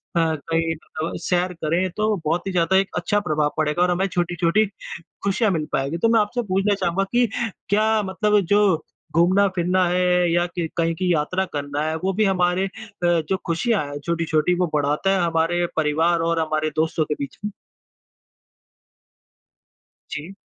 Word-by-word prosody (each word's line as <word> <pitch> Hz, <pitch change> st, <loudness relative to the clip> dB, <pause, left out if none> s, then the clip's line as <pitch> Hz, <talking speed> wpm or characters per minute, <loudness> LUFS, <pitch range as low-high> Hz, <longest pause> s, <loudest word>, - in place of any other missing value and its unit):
अ, 170 Hz, -, +3 dB
कहीं 165 Hz, +1 st, 0 dB
तो 155 Hz, +1 st, -6 dB
सैर 180 Hz, 0 st, 0 dB
करें, 170 Hz, +3 st, -1 dB
तो 215 Hz, +3 st, 0 dB
बहुत 170 Hz, +5 st, 0 dB
ही -, -, -1 dB
ज़्यादा 180 Hz, +1 st, +2 dB
एक 195 Hz, 0 st, +2 dB
अच्छा 205 Hz, -, +1 dB
प्रभाव 150 Hz, -5 st, 0 dB
पड़ेगा 155 Hz, +2 st, 0 dB
और 180 Hz, -, +2 dB
हमें 190 Hz, +2 st, +1 dB
छोटी-छोटी 175 Hz, +3 st, +1 dB, 0.6 s
खुशियाँ 200 Hz, +2 st, +1 dB
मिल 160 Hz, -4 st, -1 dB
पाएँगी। 140 Hz, +5 st, -1 dB
तो 225 Hz, +6 st, +2 dB
मैं 230 Hz, -1 st, +4 dB
आपसे 225 Hz, +4 st, 0 dB
पूछना 195 Hz, +2 st, +2 dB
चाहूँगा 195 Hz, 0 st, 0 dB
कि 245 Hz, 0 st, +4 dB, 0.4 s
क्या 215 Hz, +1 st, +3 dB
मतलब 210 Hz, +2 st, +2 dB
जो 205 Hz, -6 st, +3 dB, 0.3 s
घूमना-फिरना 185 Hz, 0 st, +3 dB
है 180 Hz, -1 st, +2 dB
या 175 Hz, +1 st, +2 dB
कि 170 Hz, -2 st, -1 dB
कहीं 165 Hz, 0 st, +1 dB
की 180 Hz, +1 st, 0 dB
यात्रा 180 Hz, +5 st, 0 dB
करना 145 Hz, 0 st, -3 dB
है, 160 Hz, -, -2 dB
वो 190 Hz, +4 st, -1 dB
भी 215 Hz, +3 st, +2 dB
हमारे 185 Hz, -1 st, +2 dB
अ, 195 Hz, -, -4 dB, 0.4 s
जो 175 Hz, +2 st, +1 dB
खुशियाँ 185 Hz, +3 st, 0 dB
है 145 Hz, 0 st, -6 dB
छोटी-छोटी 165 Hz, +1 st, 0 dB
वो 180 Hz, -3 st, +1 dB
बढ़ाता 150 Hz, +5 st, +1 dB
है 195 Hz, -, +2 dB
हमारे 165 Hz, +1 st, +1 dB
परिवार 160 Hz, +2 st, +2 dB
और 170 Hz, -, +1 dB
हमारे 155 Hz, -1 st, 0 dB
दोस्तों 160 Hz, 0 st, +1 dB
के 150 Hz, -, -2 dB
बीच 140 Hz, -, -6 dB
में? 210 Hz, -, -2 dB, 2.6 s
जी। 165 Hz, +6 st, -6 dB
175 Hz, 165 wpm, -22 LUFS, 160-190 Hz, 2.6 s, मैं